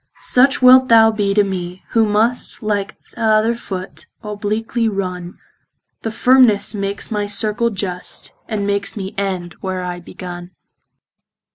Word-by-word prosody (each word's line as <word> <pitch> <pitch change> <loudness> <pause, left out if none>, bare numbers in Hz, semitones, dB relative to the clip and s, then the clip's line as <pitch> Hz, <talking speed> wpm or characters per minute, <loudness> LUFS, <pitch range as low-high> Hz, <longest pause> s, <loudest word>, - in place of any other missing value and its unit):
Such 260 +1 +3
wilt 255 +1 +8
thou 225 -1 +6
be 205 -2 -1
to 205 - +5
mee, 185 -2 -5
who 225 -1 +2
must 220 +3 0
Like 205 -2 -2
th' - - -27
other 220 0 +3
foot, 190 -5 -8 0.2
obliquely 215 +2 -2
runne; 180 -3 -5 0.6
Thy 225 - -3
firmnes 245 -2 +4
drawes 200 0 -4
my 205 -1 -1
circle 215 +3 0
just, 190 -4 -4
And 210 -3 -2
makes 200 0 -2
me 195 0 -5
end, 185 -4 -3
where 185 -1 -3
I 180 0 -4
begunne. 175 0 -9
205 Hz, 140 wpm, -18 LUFS, 190-225 Hz, 0.6 s, wilt